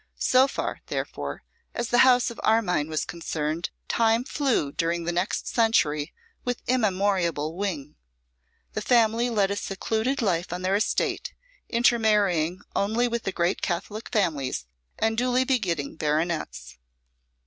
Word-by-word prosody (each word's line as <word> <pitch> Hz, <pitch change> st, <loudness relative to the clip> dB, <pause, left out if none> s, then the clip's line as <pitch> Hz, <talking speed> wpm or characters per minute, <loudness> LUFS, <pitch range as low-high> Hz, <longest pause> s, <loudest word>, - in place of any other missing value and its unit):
So 255 Hz, +1 st, +4 dB
far, -, -, -3 dB
therefore, -, -, -4 dB, 0.3 s
as 240 Hz, -1 st, -2 dB
the 245 Hz, -, +3 dB
house 250 Hz, -1 st, +5 dB
of 235 Hz, -, -11 dB
Armine 180 Hz, -9 st, +2 dB
was 155 Hz, -1 st, -1 dB
concerned, 165 Hz, -1 st, -3 dB, 0.2 s
time 230 Hz, +1 st, +2 dB
flew 260 Hz, -, 0 dB
during 170 Hz, +2 st, -1 dB
the 170 Hz, -, -1 dB
next 175 Hz, +3 st, -1 dB
century 155 Hz, -11 st, +2 dB, 0.3 s
with 245 Hz, -1 st, -3 dB
immemorable 190 Hz, -, +1 dB
wing. 165 Hz, -7 st, -4 dB, 0.8 s
The -, -, -2 dB
family 235 Hz, 0 st, +3 dB
led 205 Hz, -4 st, +1 dB
a -, -, 0 dB
secluded 220 Hz, +6 st, -1 dB
life 175 Hz, -4 st, 0 dB
on 180 Hz, +1 st, -4 dB
their 190 Hz, +1 st, +2 dB
estate, 210 Hz, -, -1 dB, 0.3 s
intermarrying 210 Hz, -7 st, +2 dB
only 220 Hz, +5 st, +1 dB
with 235 Hz, -1 st, -3 dB
the 195 Hz, -, 0 dB
great 175 Hz, 0 st, 0 dB
Catholic 200 Hz, +5 st, -3 dB
families, 145 Hz, -, 0 dB, 0.3 s
and 220 Hz, 0 st, +1 dB
duly 250 Hz, +1 st, +2 dB
begetting 180 Hz, -, -1 dB
baronets. 150 Hz, -, -2 dB
200 Hz, 135 wpm, -26 LUFS, 165-230 Hz, 0.8 s, house